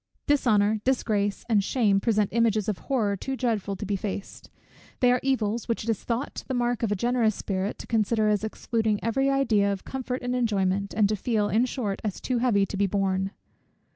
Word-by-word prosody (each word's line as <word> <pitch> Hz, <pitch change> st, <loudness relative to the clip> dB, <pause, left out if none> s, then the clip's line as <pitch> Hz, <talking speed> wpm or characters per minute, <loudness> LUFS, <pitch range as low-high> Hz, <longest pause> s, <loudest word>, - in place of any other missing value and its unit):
Dishonour, 220 Hz, -7 st, +3 dB
disgrace, 210 Hz, -6 st, 0 dB
and 215 Hz, -4 st, +3 dB
shame 205 Hz, -3 st, +2 dB
present 210 Hz, -1 st, +1 dB
images 220 Hz, -2 st, +2 dB
of 210 Hz, -3 st, -1 dB
horror 220 Hz, -7 st, 0 dB
too 265 Hz, +7 st, -4 dB
dreadful 220 Hz, -6 st, -1 dB
to 205 Hz, -, -6 dB
be 205 Hz, 0 st, -1 dB
faced; 200 Hz, 0 st, -6 dB, 0.5 s
they 250 Hz, -1 st, +5 dB
are 250 Hz, -, +3 dB
evils, 235 Hz, -4 st, 0 dB
which 230 Hz, -2 st, -1 dB
it 230 Hz, -, 0 dB
is 220 Hz, -, -4 dB
thought 240 Hz, +4 st, -3 dB
the 260 Hz, -, -2 dB
mark 240 Hz, -1 st, 0 dB
of 225 Hz, -3 st, 0 dB
a -, -, +2 dB
generous 235 Hz, 0 st, +1 dB
spirit 195 Hz, +1 st, -3 dB
to -, -, -9 dB
consider 220 Hz, -1 st, +1 dB
as 210 Hz, -1 st, +1 dB
excluding 220 Hz, -1 st, -1 dB
every 270 Hz, +5 st, +1 dB
idea 225 Hz, -7 st, +2 dB
of 195 Hz, -1 st, -5 dB
comfort 255 Hz, -1 st, -4 dB
and 245 Hz, 0 st, -1 dB
enjoyment, 200 Hz, -4 st, 0 dB
and 210 Hz, -2 st, +5 dB
to 215 Hz, -, +1 dB
feel, 210 Hz, 0 st, 0 dB
in 230 Hz, +3 st, +3 dB
short, 230 Hz, -6 st, -3 dB
as 210 Hz, -4 st, -3 dB
too 250 Hz, -2 st, -1 dB
heavy 220 Hz, -5 st, +3 dB
to 195 Hz, -, -6 dB
be 200 Hz, 0 st, +2 dB
borne. 195 Hz, 0 st, 0 dB
220 Hz, 200 wpm, -26 LUFS, 200-245 Hz, 0.5 s, they